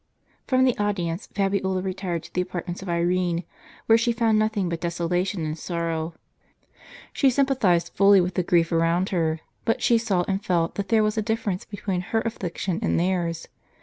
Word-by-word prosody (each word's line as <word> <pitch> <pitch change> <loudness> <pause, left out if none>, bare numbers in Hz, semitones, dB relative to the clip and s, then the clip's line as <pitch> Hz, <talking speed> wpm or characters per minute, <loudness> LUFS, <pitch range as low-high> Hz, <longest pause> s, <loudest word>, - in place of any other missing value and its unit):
From 260 -1 +3
the 255 -2 +3
audience 185 -3 -1
Fabiola 195 -2 -1
retired 185 -3 -3
to - - -14
the 180 - +1
apartments 180 0 -5
of 190 - -7
Irene, 175 0 0 0.4
where 225 0 +5
she 235 +1 +2
found 225 -2 +2
nothing 215 -3 0
but 170 -1 -3
desolation 175 +1 -1
and 155 0 -3
sorrow. 165 -1 -3 1.0
She 275 - +4
sympathized 240 -11 +2
fully 200 0 +6
with 180 0 0
the 185 - +1
grief 170 -1 +2
around 170 +3 +2
her, 160 -3 0 0.2
but 225 - 0
she 235 -1 +4
saw 200 -6 +1
and 195 0 -1
felt 170 -4 +1
that 200 -2 -4
there 220 -1 +4
was 215 +1 0
a - - +1
difference 215 -4 -2
between 200 -3 -3
her 225 +5 -1
affliction 190 -5 -3
and - - +1
theirs. 170 -2 -1
185 Hz, 180 wpm, -24 LUFS, 170-210 Hz, 1.0 s, fully